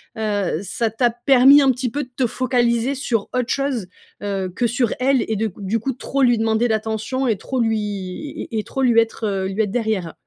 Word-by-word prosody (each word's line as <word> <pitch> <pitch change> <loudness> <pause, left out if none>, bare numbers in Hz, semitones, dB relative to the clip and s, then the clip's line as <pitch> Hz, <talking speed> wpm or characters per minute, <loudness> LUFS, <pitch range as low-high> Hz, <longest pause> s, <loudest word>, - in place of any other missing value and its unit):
heu, 205 -6 -1
ça 225 +2 -2
t'a 240 +2 +2
permis 255 +4 +6
un 270 - +5
petit 250 0 -2
peu 290 +5 -3
de 255 - -14
te 255 -1 +1
focaliser 240 +1 +1
sur 245 -5 -1
autre 250 0 +1
chose, 270 -8 -1 0.3
heu, 195 -2 -2
que 240 - +1
sur 240 -1 0
elle 260 -2 +2
et 220 - -1
de 220 +2 0
q 200 - -9
du 210 +4 0
coup 265 +4 -2
trop 275 +2 -3
lui 245 -3 +4
demander 225 +2 +1
d'attention 220 +4 -2
et 225 - +2
trop 255 +7 -4
lui 225 -1 +1 0.7
et 225 - -1
et - - -3
trop 270 - -3
lui 235 -3 +5
être, 225 0 -1
heu, 195 -2 -1
lui 195 +3 0
être 205 - -3
derrière. 215 -7 -1
230 Hz, 220 wpm, -21 LUFS, 220-255 Hz, 0.7 s, permis